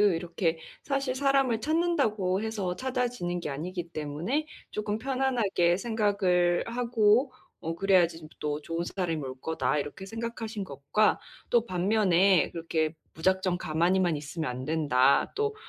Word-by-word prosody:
이렇게 170 Hz, -1 st, -1 dB, 0.2 s
사실 275 Hz, -2 st, -1 dB
'사람을 270 Hz, -4 st, +2 dB
찾는다고 275 Hz, -, +1 dB
해서 205 Hz, -5 st, -2 dB
찾아지는 245 Hz, -8 st, -2 dB
게 160 Hz, -, -5 dB
아니기 170 Hz, +4 st, -5 dB
때문에 165 Hz, -, -2 dB, 0.3 s
쪼끔 210 Hz, 0 st, -2 dB
편안하게 235 Hz, -9 st, +1 dB
생각을 200 Hz, -6 st, +1 dB
하고 235 Hz, +1 st, +2 dB, 0.3 s
어 165 Hz, +1 st, -3 dB
그래야지 180 Hz, -3 st, +3 dB
좀 155 Hz, -, -11 dB
또 150 Hz, 0 st, -2 dB
좋은 165 Hz, +2 st, -3 dB
사람이 175 Hz, -4 st, -2 dB
올 130 Hz, -1 st, -6 dB
거다.' 160 Hz, -1 st, -1 dB
이렇게 145 Hz, +7 st, -4 dB
생각하신 225 Hz, -1 st, -5 dB
것과 145 Hz, +9 st, +1 dB, 0.3 s
또 235 Hz, -1 st, +3 dB
반면에 185 Hz, -2 st, +3 dB
"그렇게 160 Hz, -1 st, -1 dB, 0.2 s
무작정 185 Hz, +2 st, +1 dB
가만히만 170 Hz, +1 st, +1 dB
있으면 155 Hz, 0 st, -4 dB
안된다. 130 Hz, 0 st, +2 dB
또 430 Hz, 0 st, 0 dB
185 Hz, 310 characters per minute, -28 LUFS, 165-225 Hz, 0.3 s, 그래야지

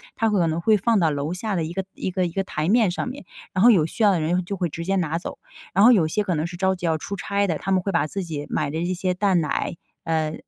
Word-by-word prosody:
他 225 Hz, -, +1 dB
可 190 Hz, -5 st, +2 dB
能 -, -, 0 dB
会 215 Hz, +4 st, +4 dB
放 220 Hz, +2 st, +2 dB
到 165 Hz, -3 st, +2 dB
楼 145 Hz, +3 st, -2 dB
下 200 Hz, +3 st, -3 dB
的 170 Hz, -, 0 dB
一 160 Hz, +2 st, -5 dB
个 190 Hz, +1 st, -2 dB
一 185 Hz, -, -4 dB
个 185 Hz, 0 st, 0 dB
一 170 Hz, -, -3 dB
个 195 Hz, +3 st, -1 dB
台 155 Hz, -4 st, -3 dB
面 220 Hz, -2 st, +4 dB
上 175 Hz, -, -3 dB
面， 255 Hz, -4 st, -7 dB, 0.3 s
然 185 Hz, -, +2 dB
后 240 Hz, -, +8 dB
有 175 Hz, -8 st, +4 dB
需 190 Hz, +7 st, -3 dB
要 205 Hz, -, +6 dB
的 180 Hz, -, +1 dB
人 175 Hz, +4 st, 0 dB
就 200 Hz, -, -4 dB
会 180 Hz, -1 st, 0 dB
直 165 Hz, +3 st, -6 dB
接 195 Hz, +2 st, 0 dB
拿 165 Hz, -3 st, 0 dB
走。 175 Hz, -, -7 dB, 0.4 s
然 195 Hz, -, +4 dB
后 245 Hz, -, +9 dB
有 185 Hz, -10 st, +4 dB
些 210 Hz, +7 st, 0 dB
可 190 Hz, -3 st, -1 dB
能 155 Hz, +2 st, -1 dB
是 175 Hz, -, -8 dB
着 190 Hz, +1 st, +1 dB
急 180 Hz, -1 st, -6 dB
要 160 Hz, -1 st, +1 dB
出 180 Hz, +6 st, -5 dB
差 200 Hz, +1 st, -1 dB
的， 165 Hz, -4 st, -1 dB
他 195 Hz, -, -4 dB
们 190 Hz, -1 st, +3 dB
会 195 Hz, -, -2 dB
把 170 Hz, -4 st, +1 dB
自 195 Hz, +5 st, -4 dB
己 155 Hz, -4 st, -5 dB
买 -, -, -1 dB
的 160 Hz, -, -3 dB
这 180 Hz, -, -1 dB
些 185 Hz, 0 st, -1 dB
蛋 185 Hz, -1 st, +2 dB
奶， 150 Hz, +2 st, -2 dB, 0.3 s
呃， 160 Hz, -2 st, -1 dB
180 Hz, 330 characters per minute, -23 LUFS, 165-200 Hz, 0.4 s, 后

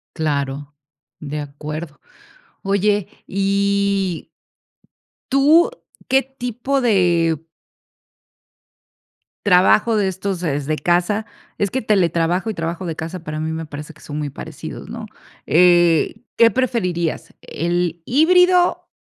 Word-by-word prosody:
Claro, 145 Hz, -2 st, -2 dB, 0.5 s
de 150 Hz, 0 st, -5 dB
acuerdo, 150 Hz, +2 st, -7 dB, 0.6 s
oye, 200 Hz, 0 st, +1 dB, 0.2 s
y 200 Hz, -2 st, 0 dB, 1.0 s
tu 295 Hz, -, +5 dB, 0.4 s
que 270 Hz, +1 st, +4 dB
tipo 260 Hz, +1 st, -3 dB
de 170 Hz, -, +2 dB, 2.0 s
trabajo 205 Hz, +4 st, +4 dB
de 200 Hz, -2 st, +2 dB
estos, 190 Hz, 0 st, -3 dB
¿desde 150 Hz, -2 st, -1 dB
casa? 175 Hz, +6 st, +1 dB, 0.3 s
Es 200 Hz, -2 st, 0 dB
que 260 Hz, -, -2 dB
teletrabajo 180 Hz, -2 st, +1 dB
y 220 Hz, -, -2 dB
trabajo 165 Hz, +2 st, -4 dB
de 165 Hz, -2 st, -4 dB
casa, 165 Hz, +2 st, -6 dB
para 155 Hz, -1 st, -5 dB
mí 160 Hz, +1 st, -2 dB
me 160 Hz, 0 st, -5 dB
parece 150 Hz, +1 st, -8 dB
que 155 Hz, -, -21 dB
son 145 Hz, -, -7 dB
muy 150 Hz, -1 st, -3 dB
parecidos, -, -, -8 dB
¿no? -, -, -7 dB, 0.4 s
Eh, 175 Hz, -1 st, +4 dB, 0.2 s
¿qué 230 Hz, 0 st, +7 dB
preferirías, 180 Hz, -11 st, -1 dB
el 175 Hz, 0 st, -2 dB
híbrido? 360 Hz, +5 st, +4 dB
180 Hz, 110 wpm, -20 LUFS, 160-210 Hz, 2.0 s, qué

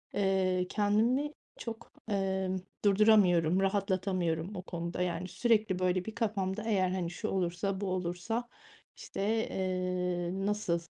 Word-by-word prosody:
eee, 190 Hz, -2 st, +2 dB
kendimi 225 Hz, +8 st, +2 dB, 0.3 s
çok, 230 Hz, -1 st, -7 dB, 0.2 s
emm, 190 Hz, -1 st, 0 dB, 0.3 s
durduramıyorum, 195 Hz, -4 st, +5 dB
rahatlatamıyorum 190 Hz, -2 st, 0 dB
o 180 Hz, -, -4 dB
konuda. 170 Hz, -1 st, -4 dB
Yani, 180 Hz, 0 st, -1 dB
sürekli, 210 Hz, -1 st, +2 dB
böyle, 185 Hz, 0 st, +1 dB
bir 220 Hz, -, -6 dB
kafamda 205 Hz, -2 st, -1 dB
eğer, 195 Hz, -5 st, +2 dB
hani, 180 Hz, -2 st, -1 dB
"Şu -, -, -4 dB
olursa 190 Hz, +2 st, -1 dB
bu 200 Hz, -, -1 dB
olursa, 185 Hz, +6 st, -2 dB, 0.5 s
işte, -, -, -6 dB, 0.3 s
eee, 180 Hz, -1 st, -1 dB, 0.2 s
nasıl, 205 Hz, -5 st, 0 dB
190 Hz, 120 wpm, -31 LUFS, 180-205 Hz, 0.5 s, durduramıyorum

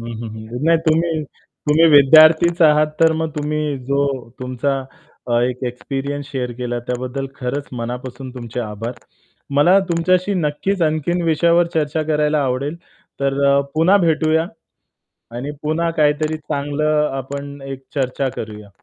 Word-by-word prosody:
हं, 115 Hz, -, -7 dB
हं, 115 Hz, -, -5 dB
हं. 110 Hz, +5 st, -6 dB
नाही 165 Hz, 0 st, +4 dB
तुम्ही, 160 Hz, 0 st, +2 dB, 0.5 s
तुम्ही 155 Hz, +3 st, +5 dB
विद्यार्थीच 155 Hz, +4 st, +6 dB
आहात 155 Hz, -1 st, +5 dB, 0.2 s
तर 160 Hz, 0 st, +6 dB
मग 160 Hz, -1 st, -1 dB
तुम्ही 150 Hz, -1 st, -2 dB
जो 140 Hz, +2 st, 0 dB, 0.4 s
तुमचा 130 Hz, +2 st, -1 dB, 0.7 s
एक 125 Hz, +1 st, -3 dB
एक्सपिरियन्स 135 Hz, +3 st, -4 dB
शेअर 125 Hz, -3 st, -3 dB
केला 120 Hz, -1 st, -2 dB
त्याबद्दल 130 Hz, +2 st, -3 dB
खरंच 135 Hz, +3 st, -4 dB
मनापासून 125 Hz, +2 st, -6 dB
तुमचे 120 Hz, -1 st, -5 dB
आभार. 110 Hz, +1 st, -5 dB, 0.6 s
मला 175 Hz, +7 st, +5 dB
तुमच्याशी 180 Hz, +3 st, +1 dB
नक्कीच 175 Hz, +3 st, -1 dB
आणखीन 155 Hz, +3 st, 0 dB
विषयावर 170 Hz, +2 st, +3 dB
चर्चा 155 Hz, 0 st, 0 dB
करायला 150 Hz, 0 st, +2 dB
आवडेल. 135 Hz, +5 st, -2 dB, 0.4 s
तर 140 Hz, 0 st, 0 dB
अ, 140 Hz, 0 st, +4 dB
पुन्हा 165 Hz, +6 st, +4 dB
भेटूया. 160 Hz, 0 st, +2 dB, 0.9 s
आणि 135 Hz, +4 st, -4 dB
पुन्हा 160 Hz, +2 st, 0 dB
काहीतरी 155 Hz, +1 st, +2 dB
चांगलं 150 Hz, 0 st, 0 dB
आपण 140 Hz, +2 st, -6 dB
एक 135 Hz, -1 st, -7 dB
चर्चा 135 Hz, -1 st, -1 dB
करूया. 105 Hz, -1 st, -7 dB
145 Hz, 135 wpm, -19 LUFS, 130-155 Hz, 0.9 s, विद्यार्थीच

